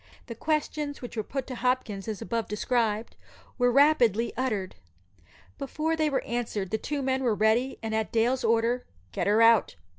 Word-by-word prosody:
The 235 Hz, -, -7 dB
questions 300 Hz, +2 st, -2 dB
which 245 Hz, -, -7 dB
were 220 Hz, -, 0 dB
put 265 Hz, +5 st, -4 dB
to 260 Hz, -, -7 dB
Hopkins, 240 Hz, -5 st, -1 dB
as 215 Hz, -3 st, -4 dB
above 230 Hz, +3 st, -2 dB
described, 220 Hz, 0 st, -1 dB, 0.4 s
were 245 Hz, 0 st, +4 dB
rapidly 240 Hz, -5 st, +4 dB
uttered. 215 Hz, -7 st, -2 dB, 0.9 s
Before 305 Hz, +4 st, -1 dB
they 310 Hz, -1 st, +1 dB
were 275 Hz, -, -1 dB
answered 225 Hz, -5 st, -3 dB
the 220 Hz, -, 0 dB
two 285 Hz, +2 st, -3 dB
men 265 Hz, 0 st, 0 dB
were 235 Hz, -4 st, +2 dB
ready, 220 Hz, +5 st, +2 dB
and 220 Hz, 0 st, -3 dB
at 220 Hz, 0 st, -1 dB
Dale's 240 Hz, +3 st, +1 dB
order, 230 Hz, +2 st, +2 dB, 0.3 s
"Get -, -, -2 dB
her 215 Hz, +3 st, +4 dB
out!" 230 Hz, -, +4 dB
235 Hz, 175 wpm, -27 LUFS, 220-265 Hz, 0.9 s, were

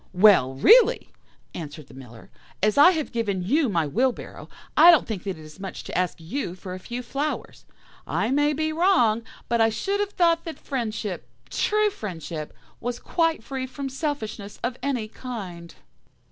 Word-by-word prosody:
"'Well, 180 Hz, -9 st, +5 dB
really,' 465 Hz, -, +5 dB, 0.4 s
answered 155 Hz, -2 st, -7 dB
the 130 Hz, -, -17 dB
Miller, 125 Hz, -4 st, -13 dB, 0.3 s
'as 210 Hz, 0 st, +3 dB
I 290 Hz, +5 st, +8 dB
have 320 Hz, -5 st, -1 dB
given 205 Hz, -6 st, -1 dB
you 275 Hz, -, +2 dB
my 170 Hz, -5 st, +1 dB
wheelbarrow, 240 Hz, -, -2 dB, 0.3 s
I 330 Hz, +3 st, +9 dB
don't 330 Hz, -5 st, +6 dB
think 215 Hz, -5 st, -4 dB
that 190 Hz, -4 st, -3 dB
it 155 Hz, -, -12 dB
is 155 Hz, +4 st, -14 dB
much 195 Hz, -1 st, -7 dB
to -, -, -7 dB
ask 180 Hz, +1 st, 0 dB
you 175 Hz, -, -4 dB
for 185 Hz, 0 st, -8 dB
a 185 Hz, -, -6 dB
few 240 Hz, +5 st, -6 dB
flowers. 285 Hz, +5 st, -4 dB, 0.4 s
I 225 Hz, -, 0 dB
may 290 Hz, +2 st, +3 dB
be 310 Hz, +1 st, -1 dB
wrong, 310 Hz, -, +3 dB, 0.3 s
but 235 Hz, -1 st, +1 dB
I 225 Hz, -, +5 dB
should 395 Hz, -, -2 dB
have 410 Hz, 0 st, -2 dB
thought 335 Hz, -1 st, +3 dB
that 330 Hz, -, -6 dB
friendship, 220 Hz, -7 st, -4 dB, 0.2 s
true 425 Hz, 0 st, +2 dB
friendship, 165 Hz, -, -6 dB, 0.3 s
was 245 Hz, 0 st, -3 dB
quite 330 Hz, -4 st, 0 dB
free 260 Hz, +1 st, -4 dB
from 270 Hz, +1 st, -5 dB
selfishness 260 Hz, -8 st, -4 dB
of 240 Hz, +1 st, -1 dB
any 250 Hz, -6 st, -1 dB
kind. 195 Hz, -8 st, -8 dB
235 Hz, 175 wpm, -25 LUFS, 185-295 Hz, 0.4 s, I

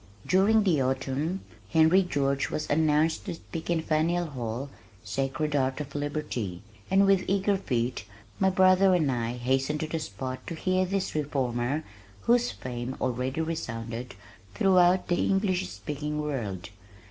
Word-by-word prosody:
During 205 Hz, +4 st, +4 dB
the 170 Hz, -8 st, +2 dB
autumn 135 Hz, +7 st, -1 dB, 0.3 s
Henry 160 Hz, +3 st, +5 dB
George 140 Hz, -6 st, 0 dB
was 155 Hz, -, -3 dB
announced 155 Hz, +1 st, +2 dB
to 180 Hz, -, -4 dB
speak 165 Hz, 0 st, -8 dB
in 165 Hz, -2 st, +1 dB
Faneuil 165 Hz, +3 st, +1 dB
Hall, 130 Hz, -2 st, -5 dB, 0.3 s
sacred 135 Hz, +7 st, -2 dB
ark 130 Hz, -1 st, +1 dB
of 145 Hz, -1 st, -6 dB
liberty, 145 Hz, -, -3 dB, 0.3 s
and 195 Hz, +1 st, +5 dB
with 195 Hz, -1 st, +4 dB
eager 200 Hz, +1 st, +2 dB
feet 125 Hz, -, -2 dB, 0.3 s
my 190 Hz, -, +4 dB
brother 185 Hz, 0 st, +5 dB
and 155 Hz, -6 st, +2 dB
I 120 Hz, -1 st, -1 dB
hastened 135 Hz, +4 st, 0 dB
to 155 Hz, -, -2 dB
the 160 Hz, +1 st, -2 dB
spot 130 Hz, -1 st, -6 dB
to 165 Hz, -, -4 dB
hear 185 Hz, +3 st, +1 dB
this 195 Hz, 0 st, -1 dB
reformer 135 Hz, -1 st, -1 dB, 0.4 s
whose 245 Hz, -, +3 dB
fame 125 Hz, +1 st, -5 dB
already 130 Hz, +4 st, -1 dB
resounded 120 Hz, -, -4 dB, 0.4 s
throughout 180 Hz, -, +4 dB
the 175 Hz, -, +1 dB
English 195 Hz, -, +1 dB
speaking 150 Hz, +11 st, -4 dB
world. 110 Hz, -11 st, -3 dB
150 Hz, 145 wpm, -28 LUFS, 130-180 Hz, 0.4 s, Henry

